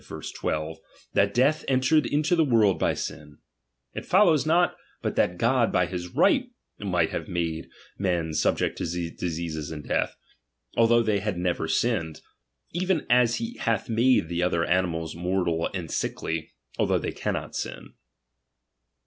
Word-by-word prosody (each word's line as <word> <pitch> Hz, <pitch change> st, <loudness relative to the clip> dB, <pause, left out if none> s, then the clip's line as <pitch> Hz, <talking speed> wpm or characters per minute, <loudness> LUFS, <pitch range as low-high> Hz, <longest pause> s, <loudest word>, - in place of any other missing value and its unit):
12), 80 Hz, +1 st, -3 dB, 0.3 s
that 100 Hz, 0 st, +3 dB
death 130 Hz, +8 st, +2 dB
entered 135 Hz, +4 st, +3 dB
into 155 Hz, +4 st, +2 dB
the 165 Hz, -, +4 dB
world 110 Hz, -8 st, +3 dB
hy -, -, +2 dB
sin: 75 Hz, -1 st, -6 dB, 0.6 s
it -, -, -5 dB
follows 170 Hz, -7 st, +4 dB
not 175 Hz, +2 st, +3 dB, 0.3 s
but -, -, -1 dB
that 90 Hz, -, +1 dB
God 115 Hz, +3 st, +2 dB
by 90 Hz, -, +3 dB
bis 90 Hz, 0 st, -5 dB
right 250 Hz, -, +2 dB, 0.3 s
might 90 Hz, -5 st, 0 dB
have -, -, -4 dB
made 85 Hz, -3 st, -3 dB, 0.3 s
men 85 Hz, -5 st, 0 dB
subject 75 Hz, -, 0 dB
to -, -, -1 dB, 0.3 s
diseases 80 Hz, -3 st, -4 dB
and 75 Hz, -2 st, -7 dB
death, -, -, 0 dB, 0.6 s
although 115 Hz, 0 st, +4 dB
they 105 Hz, -2 st, +1 dB
had 100 Hz, -2 st, -2 dB
never 90 Hz, 0 st, -1 dB
sinned; 80 Hz, -1 st, 0 dB, 0.5 s
even 180 Hz, -1 st, 0 dB
as 120 Hz, -1 st, +5 dB
he 115 Hz, 0 st, -4 dB
hath 115 Hz, -1 st, -1 dB
made 115 Hz, -4 st, +3 dB
the 85 Hz, +1 st, -2 dB
other 85 Hz, -1 st, +1 dB
animals 85 Hz, -3 st, 0 dB
mortal 85 Hz, -1 st, 0 dB
and 90 Hz, -5 st, -5 dB
sickly, 80 Hz, -1 st, -3 dB, 0.3 s
although -, -, +3 dB
they -, -, -3 dB
cannot -, -, -4 dB
RELIGION. -, -, -10 dB
95 Hz, 150 wpm, -26 LUFS, 85-125 Hz, 0.6 s, as